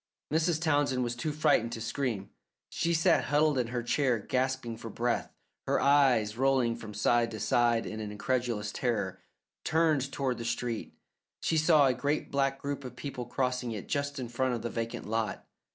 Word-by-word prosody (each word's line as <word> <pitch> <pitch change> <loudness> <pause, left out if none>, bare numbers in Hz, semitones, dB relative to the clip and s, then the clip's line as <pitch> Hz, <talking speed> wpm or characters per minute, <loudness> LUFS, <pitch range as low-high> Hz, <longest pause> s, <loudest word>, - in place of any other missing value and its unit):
Mrs. 160 0 +2
Townsend 145 -5 +1
was 120 0 -2
too 135 +6 -2
frightened 130 -6 +2
to 115 - -4
scream. 115 -4 -3 0.4
She 170 - -1
sat 165 +1 +3
huddled 150 -1 +3
in 120 - 0
her 120 0 -3
chair, 125 0 +2
gasping 130 +1 -1
for 115 0 -8
breath, 120 +2 -1 0.4
her - - +2
eyes, 130 -6 +4
rolling 130 -3 +3
from 110 -3 -9
side 115 +3 +2
to 110 - -6
side 115 +2 +2
in 110 - -5
incredulous 110 0 -2
terror, 120 -3 -2 0.4
turned 155 -4 +2
toward 130 -3 -1
the - - -4
street. 115 -1 -3 0.5
She 165 - 0
saw 155 -2 +5
a 130 - +3
great 140 +5 -1
black 135 -1 +1
group 140 0 -4
of 125 -1 -8
people 125 -2 -6
crossing 125 -2 -1
it 105 - -6
just 140 0 -2
in 130 -2 -4
front 125 +1 0
of 115 - -6
the 120 - -3
vacant 115 0 -4
lot. 110 0 -2
125 Hz, 180 wpm, -30 LUFS, 115-140 Hz, 0.5 s, saw